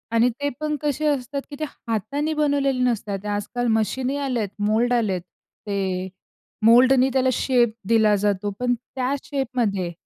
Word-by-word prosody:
आणि 230 Hz, +2 st, +5 dB
ते 285 Hz, 0 st, 0 dB
पण 305 Hz, 0 st, -1 dB
कसे 295 Hz, +1 st, -1 dB
असतात 280 Hz, -1 st, -1 dB
की 290 Hz, -, -7 dB
ते 310 Hz, -, -2 dB
हाताने 280 Hz, +4 st, -3 dB
बनवलेले 280 Hz, -3 st, +1 dB
नसतात. 210 Hz, -5 st, -1 dB
आजकाल 210 Hz, +4 st, -2 dB
मशिनही 260 Hz, +5 st, -1 dB
आल्यात 250 Hz, -8 st, -1 dB, 0.2 s
मोल्ड 235 Hz, +3 st, +2 dB
आलेत, 205 Hz, -7 st, +1 dB
ते 190 Hz, +1 st, -5 dB, 0.6 s
मोल्डनी 255 Hz, +3 st, +6 dB
त्याला 260 Hz, -1 st, +3 dB
शेप 240 Hz, -3 st, +2 dB
दिला 220 Hz, -2 st, +4 dB
जातो 205 Hz, 0 st, 0 dB
पण 250 Hz, 0 st, +1 dB
त्या 255 Hz, +2 st, -3 dB
शेपमध्ये 235 Hz, -, -1 dB
245 Hz, 145 wpm, -23 LUFS, 210-270 Hz, 0.6 s, मोल्डनी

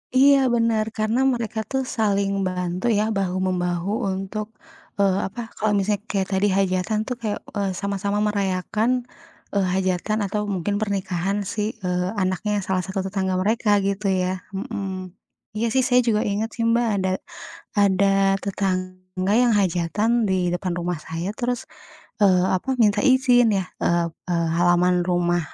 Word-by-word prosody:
Iya, 275 Hz, +2 st, +7 dB, 0.2 s
benar. 230 Hz, -2 st, +2 dB
Karena 220 Hz, +3 st, +1 dB
mereka 230 Hz, -2 st, -3 dB
tuh 265 Hz, -1 st, 0 dB
saling 200 Hz, -3 st, +1 dB, 0.2 s
bantu 180 Hz, +1 st, -3 dB
ya, 210 Hz, -, +2 dB
bahu-membahu 185 Hz, -1 st, -1 dB, 0.2 s
untuk 195 Hz, +3 st, -4 dB, 0.5 s
eee, 195 Hz, -1 st, +3 dB
apa 205 Hz, +5 st, -10 dB, 0.2 s
kalau 215 Hz, 0 st, +1 dB
misalnya 200 Hz, +1 st, +1 dB
kayak 195 Hz, -2 st, 0 dB
tadi 190 Hz, +2 st, +2 dB
hajatan 190 Hz, +2 st, +1 dB
tuh 250 Hz, -, -2 dB
kayak, 215 Hz, -2 st, -2 dB, 0.2 s
eee, 200 Hz, -1 st, 0 dB
sama-sama 200 Hz, +1 st, -2 dB
merayakan, 200 Hz, +2 st, 0 dB, 0.6 s
eee, 195 Hz, -2 st, +2 dB
hajatan 190 Hz, +3 st, 0 dB
atau 210 Hz, +2 st, -2 dB
mungkin 190 Hz, +3 st, -1 dB
pernikahan 195 Hz, -2 st, -1 dB, 0.2 s
si, 215 Hz, -, -2 dB, 0.2 s
eee, 180 Hz, 0 st, 0 dB
anaknya 185 Hz, +2 st, -1 dB
salah 185 Hz, 0 st, 0 dB
satu 190 Hz, 0 st, -3 dB
tetangga 190 Hz, -1 st, -1 dB
mereka, 220 Hz, +2 st, +1 dB, 0.2 s
gitu 200 Hz, +1 st, -1 dB
ya? 185 Hz, 0 st, 0 dB, 0.2 s
Mhm, 195 Hz, 0 st, -4 dB, 0.7 s
iya 230 Hz, +2 st, 0 dB
sih, 260 Hz, -, +4 dB
saya 250 Hz, -2 st, +4 dB
juga 215 Hz, -2 st, +3 dB
inget 210 Hz, +2 st, -1 dB
sih, 230 Hz, -, -2 dB
Mbak, 235 Hz, +1 st, +2 dB, 0.2 s
ada 190 Hz, -, +1 dB, 0.7 s
ada 200 Hz, -1 st, +4 dB, 0.4 s
tetangga 185 Hz, -1 st, -2 dB
yang 245 Hz, -1 st, +4 dB
hajatan 185 Hz, +4 st, 0 dB, 0.2 s
di 190 Hz, -, +2 dB, 0.2 s
depan 180 Hz, 0 st, -2 dB
rumah 175 Hz, 0 st, -2 dB
saya, 165 Hz, +3 st, -4 dB
terus, 245 Hz, 0 st, -2 dB, 0.6 s
eee, 185 Hz, -2 st, +5 dB
apa 185 Hz, -, -8 dB
minta 205 Hz, -1 st, +3 dB
izin 255 Hz, -3 st, +5 dB
ya, 190 Hz, -, -1 dB, 0.2 s
eee, 170 Hz, 0 st, +2 dB, 0.5 s
halaman 175 Hz, 0 st, +3 dB
rumah, 175 Hz, -1 st, +2 dB
195 Hz, 145 wpm, -23 LUFS, 185-215 Hz, 0.7 s, Iya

